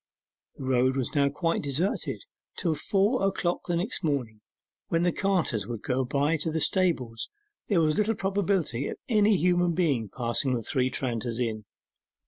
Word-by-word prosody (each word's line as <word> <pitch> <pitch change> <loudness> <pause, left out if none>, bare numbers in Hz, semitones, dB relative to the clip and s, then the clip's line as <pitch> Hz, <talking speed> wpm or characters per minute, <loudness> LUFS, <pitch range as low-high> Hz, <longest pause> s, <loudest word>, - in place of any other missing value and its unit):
The - - -8
road 130 0 +2
was 130 - -2
now 140 -2 +3
quite 165 +4 -1
deserted: 150 +7 -1 0.3
till 170 -3 +1
four 200 - +1
o'clock 190 -2 0
the 175 - 0
next 175 +5 -2
morning, 125 -9 -1 0.5
when 165 0 +1
the 175 - +3
carters 170 - 0
would 120 -3 -5
go 130 +1 0
by 140 +5 +1
to 160 - -2
the 160 0 -1
stables 145 -11 +1 0.4
there 190 -6 +3
was 155 +2 +2
little 220 +2 +2
probability 190 - 0
of - - -5
any 210 -4 +4
human 175 +1 +2
being 140 - +1
passing 125 +3 -1
the 115 - -3
Three 130 +3 +1
Tranters 120 -2 -2
Inn. 110 -3 -2
155 Hz, 165 wpm, -27 LUFS, 125-180 Hz, 0.5 s, any